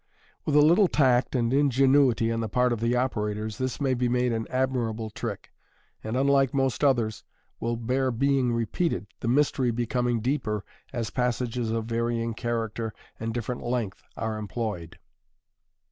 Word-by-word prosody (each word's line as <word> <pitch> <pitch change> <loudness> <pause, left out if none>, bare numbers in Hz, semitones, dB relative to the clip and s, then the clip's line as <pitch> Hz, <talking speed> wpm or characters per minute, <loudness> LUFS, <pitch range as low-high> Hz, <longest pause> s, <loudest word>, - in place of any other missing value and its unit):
With 150 - 0
a 150 - +8
little 180 +5 +5
tact 130 -5 +2
and 120 0 +1
ingenuity 135 -4 +4
on 115 - -1
the 110 -1 -2
part 125 +1 +2
of 115 - -3
the 115 +2 +1
operators, 110 -3 -1
this 130 -1 -2
may 135 -3 +1
be 125 -1 0
made 125 0 +1
an 115 0 -2
admirable 120 -4 -1
trick, 110 -1 -6 0.5
and, 110 +3 -2
unlike 140 0 +3
most 135 0 0
others, 120 -6 +2 0.4
will 120 0 -1
bear 130 +3 0
being 130 +1 +2
repeated, 115 - -1
the - - -4
mystery 130 0 +2
becoming 120 0 0
deeper 110 -4 -1 0.3
as 115 -2 -3
passages 125 -2 -1
of 115 0 -1
varying 115 0 -1
character 115 -1 -3 0.2
and 115 0 -2
different 120 +1 -3
length 120 -5 -2 0.2
are 110 -1 -2
employed. 105 -5 -4
120 Hz, 155 wpm, -27 LUFS, 115-130 Hz, 0.5 s, a